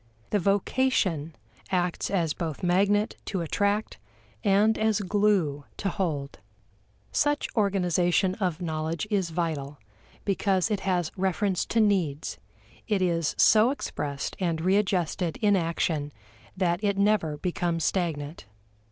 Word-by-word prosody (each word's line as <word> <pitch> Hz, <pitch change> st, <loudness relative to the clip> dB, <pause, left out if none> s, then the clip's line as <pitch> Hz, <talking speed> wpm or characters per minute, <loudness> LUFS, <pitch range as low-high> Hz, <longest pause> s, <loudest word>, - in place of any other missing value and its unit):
The 210 Hz, -, +2 dB
vocation 195 Hz, -, +1 dB, 0.3 s
acts 180 Hz, -2 st, 0 dB
as 170 Hz, -6 st, +1 dB
both 160 Hz, -2 st, -5 dB
magnet 200 Hz, +4 st, +2 dB
to 190 Hz, -4 st, -2 dB
attract 205 Hz, -, -1 dB, 0.4 s
and 205 Hz, +3 st, +4 dB
as 220 Hz, -1 st, +1 dB
glue 190 Hz, -8 st, +1 dB
to 195 Hz, -, -1 dB
hold. 150 Hz, -7 st, -3 dB, 0.7 s
Such 290 Hz, 0 st, +1 dB
organization 185 Hz, -3 st, +2 dB
of 180 Hz, -2 st, -1 dB
knowledge 160 Hz, +2 st, -2 dB
is 190 Hz, -4 st, +1 dB
vital, 155 Hz, -4 st, -3 dB, 0.5 s
because 195 Hz, 0 st, +1 dB
it 205 Hz, -, +1 dB
has 180 Hz, -4 st, 0 dB
reference 190 Hz, 0 st, 0 dB
to 230 Hz, -, +1 dB
needs; 185 Hz, -9 st, +1 dB, 0.5 s
it 205 Hz, -4 st, +1 dB
is 170 Hz, -3 st, 0 dB
so 220 Hz, +2 st, +6 dB
expressed 145 Hz, -, -4 dB
and 170 Hz, -4 st, 0 dB
readjusted 185 Hz, -2 st, +1 dB
in 205 Hz, -2 st, +3 dB
action 165 Hz, -4 st, -1 dB, 0.5 s
that 175 Hz, +1 st, 0 dB
it 200 Hz, -1 st, +1 dB
never 200 Hz, -7 st, +2 dB
becomes 170 Hz, 0 st, -1 dB
stagnant. 155 Hz, -, -2 dB
185 Hz, 120 wpm, -27 LUFS, 165-205 Hz, 0.7 s, so